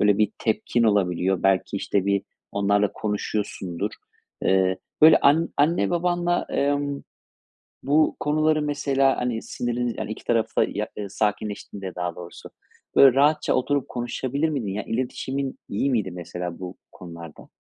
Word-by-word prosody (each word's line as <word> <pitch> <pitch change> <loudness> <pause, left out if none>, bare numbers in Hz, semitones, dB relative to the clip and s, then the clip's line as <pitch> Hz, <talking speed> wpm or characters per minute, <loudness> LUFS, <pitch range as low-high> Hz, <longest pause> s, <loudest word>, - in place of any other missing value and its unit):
böyle, 105 -1 +4
bir 105 -1 +2
tepkin 115 +1 0
olabiliyor. 95 -4 +1
Belki, 95 +1 +2
işte, 100 0 -1
bir 100 -1 +2 0.3
onlarla 100 0 +2
konuşuyorsundur. 105 -2 -3 0.5
Eee, 95 -1 +2 0.2
böyle, 160 +1 +9
an 155 +4 +4
anne 155 +6 +2
babanla, 175 0 0
emm, 145 0 0 0.8
bu 150 +3 +3
konuları 155 +1 +2
mesela, 140 -2 +1
hani, 120 -2 -2
siniriniz 120 0 -2
yani, 105 - -4
iki 110 - -7
tarafta 115 -2 +1
ya - - -3
eee, 100 -2 -4
sakinleştiğinde 105 -2 -3
daha 90 -1 -3
doğrusu, 85 -1 -10 0.5
böyle, 135 -2 +7
rahatça 150 +3 +3
oturup, 140 +2 0
konuşabilir 130 +5 -2
miydin? 135 -9 -2 0.2
İletişimin 130 +2 -3
iyi 110 +8 0
miydi 105 -7 0
mesela 90 0 -6
bu 90 0 -7 0.2
konularda? 85 -3 -11
110 Hz, 135 wpm, -24 LUFS, 95-140 Hz, 0.8 s, böyle